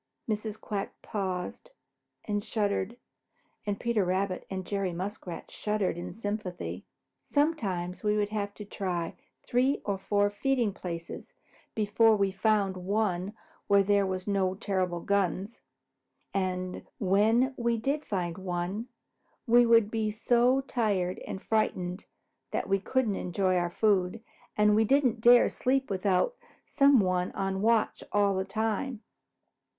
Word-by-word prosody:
Mrs. 215 0 -3
Quack 200 -2 -4
paused 185 -3 -4 0.6
and 205 -1 -1
shuddered, 210 0 -1 0.7
and 200 -1 -1
Peter 235 -4 +1
Rabbit 185 +1 -1
and 190 -1 -4
Jerry 195 -2 -2
Muskrat 185 0 -6
shuddered 210 -4 -1
in 175 - -6
sympathy. 205 -4 -5 0.4
"Sometimes 200 - -1
we 210 -1 +1
would 205 -1 +1
have 205 -1 -2
to 210 - -8
try 180 -4 -3 0.3
three 255 +3 +2
or 200 -2 -1
four 205 +1 +1
feeding 240 -1 0
places 170 -3 -7 0.4
before 220 +1 +4
we 200 -2 +1
found 195 -1 +1
one 195 0 -1 0.3
where 200 -1 +5
there 200 0 +3
were 185 0 -1
no 190 -2 +1
terrible 185 -3 -1
guns. 200 +2 -1 0.7
And 185 -1 -2
when 220 +7 +3
we 235 -1 0
did 275 +7 -1
find 175 -3 -3
one, 185 +4 -3 0.6
we 240 0 +5
would 230 -2 +5
be 220 -1 0
so 240 +4 +3
tired 205 -9 -1
and - - -4
frightened 185 -4 -1 0.4
that - - -2
we 195 0 +2
couldn't 225 0 0
enjoy 185 +1 0
our 175 -1 +1
food, 200 +2 +1 0.3
and 210 0 +5
we 220 - +4
didn't 250 -1 +2
dare 240 +1 +8
to - - +1
sleep 265 -1 0
without 195 - +1 0.3
some 275 -4 +5
one 185 -1 0
on 195 0 -2
watch 225 0 +2
all 205 -1 +3
the 190 0 0
time. 220 +4 -2
205 Hz, 135 wpm, -29 LUFS, 185-225 Hz, 0.7 s, dare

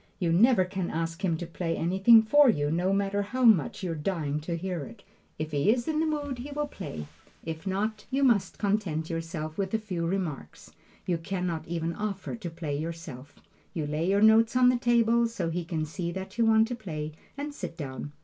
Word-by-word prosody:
You 175 -4 0
never 210 +1 +5
can 185 -1 -3
ask 165 +3 -3
him 170 -4 +1
to 175 - -5
play 165 0 -3
anything 195 +6 +6
for 290 +5 +6
you, 145 -8 +1
no 175 +4 +1
matter 200 0 +1
how 250 +6 -3
much 195 - +4
you're 175 -2 -1
dying 150 -2 -2
to 170 +2 -3
hear 180 0 -3
it. - - -12 0.3
If 155 0 -4
he 145 +6 +1
is 240 0 -1
in 310 -1 0
the 320 - +1
mood 290 -4 -2
he 265 +4 -6
will 295 +1 -2
play; 185 - -7 0.4
if 160 +3 -6
not, 210 +3 -2
you 275 +2 +1
must 235 -7 +2
content 195 -6 -1
yourself 165 -1 -4
with 195 +2 0
a - - +4
few 185 -6 -3
remarks. 165 - -4 0.3
You 175 -2 0
can 180 +2 -3
not 165 -3 -3
even 165 0 -2
offer 200 +2 -4
to 210 -7 -6
play 160 -3 -4
yourself. 155 -4 -6 0.4
You 160 -3 -1
lay 155 +4 -1
your 200 +1 +3
notes 225 +2 +5
on 250 0 +6
the 250 - +3
table, 235 -1 +3
so 185 -8 -3
he 175 +1 -2
can 160 -2 -2
see 170 +2 -4
that 190 +1 -6
you 235 -1 +2
want 220 0 +5
to 245 - -2
play, 155 -9 -5 0.3
and 290 +1 -4
sit 180 - -7
down. 140 -1 -6
185 Hz, 215 wpm, -28 LUFS, 165-220 Hz, 0.4 s, anything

